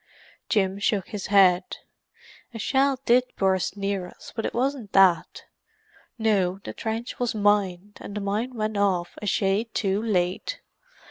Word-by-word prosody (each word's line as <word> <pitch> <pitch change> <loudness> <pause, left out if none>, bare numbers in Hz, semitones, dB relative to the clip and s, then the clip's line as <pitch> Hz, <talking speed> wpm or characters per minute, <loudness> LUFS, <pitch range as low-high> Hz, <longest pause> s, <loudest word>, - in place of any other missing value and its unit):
Jim 195 -2 +1
shook 200 -2 0
his 205 -3 -5
head. 185 -2 +4 0.8
"A - - -3
shell 265 +4 +1
did 245 +1 +5
burst 190 0 0
near 195 -2 -2
us, - - -13
but 225 - -1
it - - -6
wasn't 255 -3 -2
that. 185 -4 +3 0.7
No, 200 -5 +1
the - - -6
trench 225 +2 -4
was 245 -2 -1
mined, 205 -2 0
and 205 - -8
the - - -2
mine 215 +6 -2
went 215 -1 -2
off 185 -4 0
a 210 - -4
shade 200 +4 +1
too 195 0 0
late. 205 - -1
205 Hz, 150 wpm, -25 LUFS, 190-225 Hz, 0.8 s, did